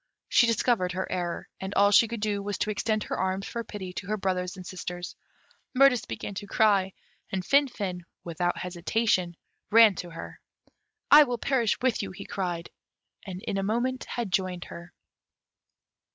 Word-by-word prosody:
She 240 - +5
discovered 225 -5 +1
her 190 +1 -2
error, 175 -2 -3
and 190 +1 -5
all 200 0 +5
she 225 +3 +6
could 230 -1 -5
do 205 -1 0
was 205 0 -3
to 215 - -1
extend 215 +1 -1
her - - -4
arms 190 +1 -1
for 235 - -4
pity 190 -5 -7
to 190 - -6
her 215 +1 -1
brothers 185 -1 -2
and 185 - -9
sisters. 180 -1 -6 0.6
Mirtis 265 -2 +5
began - - -5
to 205 +1 -6
cry, 200 -3 +3 0.4
and 185 -2 -2
Finfin, 210 -11 +1 0.2
without 175 +1 -1
hesitation, 180 0 0 0.3
ran 225 -1 +7
to 175 - -5
her. 165 0 -9 0.7
"I 295 0 +10
will 245 -2 -2
perish 240 -3 +1
with 255 -3 +2
you," 200 - -4
he 185 +2 -9
cried, 175 -3 -4 0.6
and 185 0 -7
in 195 - -2
a - - 0
moment 240 +6 -1
had 235 -5 -4
joined 185 -2 -1
her. 170 +1 -10
195 Hz, 170 wpm, -27 LUFS, 180-225 Hz, 0.7 s, I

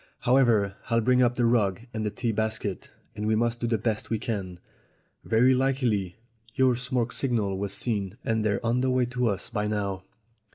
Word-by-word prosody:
"However, 115 -6 +3
I'll 115 -1 +3
bring 125 +2 +3
up 120 -1 +3
the 120 - +1
rug 110 -5 +2
and 110 - -3
the 105 - 0
tea 115 +3 -2
basket, 110 -2 -3 0.3
and 105 +1 -3
we 110 - +3
must 120 +1 0
do 120 - -1
the 115 -1 +1
best 110 0 -2
we 115 - 0
can. 95 -6 -4 0.6
Very 125 +4 +4
likely 125 -8 0 0.4
your 130 -2 +3
smoke 125 -1 -1
signal 110 -7 0
was 100 0 -2
seen, 100 -3 -2
and 110 -1 0
they're 105 +1 0
on 120 +2 +1
the 130 - +1
way 130 -1 +2
to 125 0 -1
us 100 -1 -2
by 105 -2 -1
now." 100 -3 -2
115 Hz, 195 wpm, -27 LUFS, 105-125 Hz, 0.6 s, Very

